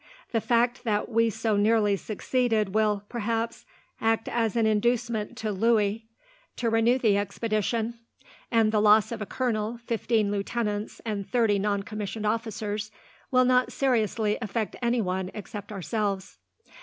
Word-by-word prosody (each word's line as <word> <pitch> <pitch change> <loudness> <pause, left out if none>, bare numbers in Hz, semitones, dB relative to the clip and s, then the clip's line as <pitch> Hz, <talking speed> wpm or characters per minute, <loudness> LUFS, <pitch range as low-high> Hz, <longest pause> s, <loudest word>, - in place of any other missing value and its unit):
"The 225 - +1
fact 240 +1 +1
that 210 -2 0
we 230 0 +3
so 220 0 0
nearly 210 0 +3
succeeded 215 0 0
will, 210 -2 +2
perhaps, 230 0 -2 0.4
act 225 0 +1
as 230 -2 0
an 230 -1 +3
inducement 225 0 0
to 220 -1 -2
Louis 220 +1 +1 0.5
to 230 -2 -1
renew 225 +3 +4
the 220 -6 +3
expedition; 220 +3 -1 0.5
and 225 -2 +3
the 215 -1 +2
loss 215 +1 +5
of 225 -2 -4
a 210 - -4
colonel, 230 -2 -1
fifteen 225 -2 +1
lieutenants, 210 +1 -2
and 205 -3 -3
thirty 225 -5 +2
noncommissioned 210 +1 -2
officers 215 -1 -2 0.4
will 255 -1 +4
not 250 0 +3
seriously 220 -5 +1
affect 220 -1 -2
anyone 190 -6 0
except 210 0 -7
ourselves." 200 +1 -3
220 Hz, 135 wpm, -27 LUFS, 210-230 Hz, 0.5 s, loss